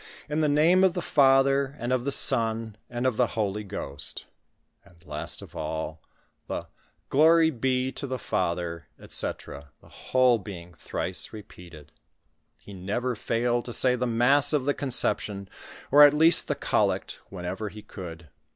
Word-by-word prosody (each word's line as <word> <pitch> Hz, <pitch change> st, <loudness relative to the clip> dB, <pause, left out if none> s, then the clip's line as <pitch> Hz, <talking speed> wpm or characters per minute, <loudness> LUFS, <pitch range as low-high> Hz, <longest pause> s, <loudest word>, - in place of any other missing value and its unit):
lu 150 Hz, +2 st, -1 dB
the 150 Hz, -, +2 dB
name 165 Hz, +6 st, +4 dB
of 190 Hz, -2 st, +3 dB
the -, -, -1 dB
Father, 135 Hz, -2 st, +3 dB
and 120 Hz, -1 st, -2 dB
of 125 Hz, -1 st, -1 dB
the 140 Hz, -, 0 dB
Son, 115 Hz, -5 st, +1 dB, 0.2 s
ond 120 Hz, +1 st, -3 dB
of 130 Hz, -4 st, +1 dB
the 125 Hz, -2 st, 0 dB
Holy 105 Hz, -1 st, -1 dB
Ghost," 70 Hz, -8 st, -6 dB, 0.6 s
and 85 Hz, -1 st, -22 dB
lost 75 Hz, 0 st, -4 dB
of -, -, -14 dB
all 80 Hz, 0 st, -5 dB, 0.5 s
the -, -, -4 dB, 0.4 s
"Glory 160 Hz, +3 st, +5 dB
bo 130 Hz, 0 st, -1 dB
to 140 Hz, -, -6 dB
the 130 Hz, 0 st, -3 dB
Father," 85 Hz, -5 st, -3 dB
«fec., 70 Hz, +1 st, -3 dB
the -, -, -20 dB
whole 130 Hz, -2 st, +2 dB
being 90 Hz, -3 st, -10 dB
thrice -, -, -2 dB
rcpoatod. 85 Hz, -7 st, -13 dB, 0.8 s
lie 100 Hz, -, -10 dB
never 105 Hz, +7 st, -3 dB
failed 120 Hz, +2 st, -1 dB
to 120 Hz, -, -6 dB
say 125 Hz, +1 st, +3 dB
the 125 Hz, 0 st, -2 dB
mast* 125 Hz, +6 st, +4 dB
of 145 Hz, -4 st, +1 dB
the 145 Hz, -, +2 dB
Conception, 105 Hz, -7 st, -1 dB, 0.4 s
or 145 Hz, +2 st, +7 dB
at 145 Hz, 0 st, +8 dB
least 160 Hz, +3 st, +5 dB
the -, -, -1 dB
collect, -, -, -1 dB
whenever 95 Hz, +3 st, -5 dB
ho 105 Hz, +2 st, -11 dB
could 85 Hz, -4 st, -9 dB
120 Hz, 160 wpm, -26 LUFS, 95-135 Hz, 0.8 s, at